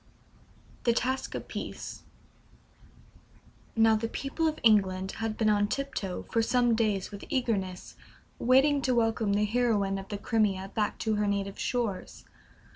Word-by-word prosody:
THE 235 - +4
TASKS 260 +3 -1
OF - - -5
PEACE. - - -6 1.7
Now, 225 -1 +5
the 225 +1 -1
people 275 +7 -2
of 310 - -1
England 190 -4 +3
had 225 -1 -2
been 220 - +1
on 205 -1 +3
tiptoe 215 -8 -3
for 230 - +3
some 240 +1 +2
days 215 -4 0
with 200 -1 -8
eagerness, 200 -8 -2 0.4
waiting 275 +3 +4
to 255 -2 +1
welcome 225 -3 +1
the 210 +1 +2
heroine 210 -4 +1
of 195 - -9
the 205 - -4
Crimea 200 -3 0
back 210 -2 -1
to 215 -1 +1
her 210 0 +1
native 200 -1 -2
shores. 235 -6 -3
220 Hz, 145 wpm, -29 LUFS, 200-240 Hz, 1.7 s, Now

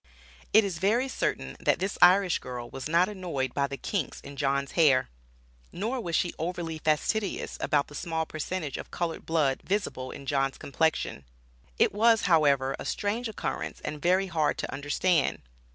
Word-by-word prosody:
It 220 +1 +7
is 180 -5 -3
very 225 +8 +2
certain, 260 - -2
that - - +2
this 195 +2 -3
Irish 180 0 +6
girl 125 -1 -7
was 135 +2 -6
not 170 +3 +4
annoyed 170 -11 -3
by 140 0 +1
the 140 0 -6
kinks 185 -3 -3
in 140 - -10
John's 140 0 0
hair. 140 - +4 0.6
Nor 230 +7 -2
was 170 -5 -2
she 175 - +1
overly 165 -1 -3
fastidious 185 +7 0
about 145 -1 +2
the - - -15
small 160 +2 -2
percentage 155 -1 -4
of - - -8
colored 170 -2 -4
blood 150 -5 +1
visible 185 -10 -2
in 140 - -9
John's 135 -1 0
complexion. 160 - -1 0.5
It - - +3
was, 225 +1 +4
however, 140 -6 +3
a - - -5
strange 220 +3 -2
occurrence 215 - -4
and 150 -1 -5
very 185 +2 +3
hard 160 -5 0
to - - -4
understand. 145 +3 +1
165 Hz, 170 wpm, -28 LUFS, 140-190 Hz, 0.6 s, It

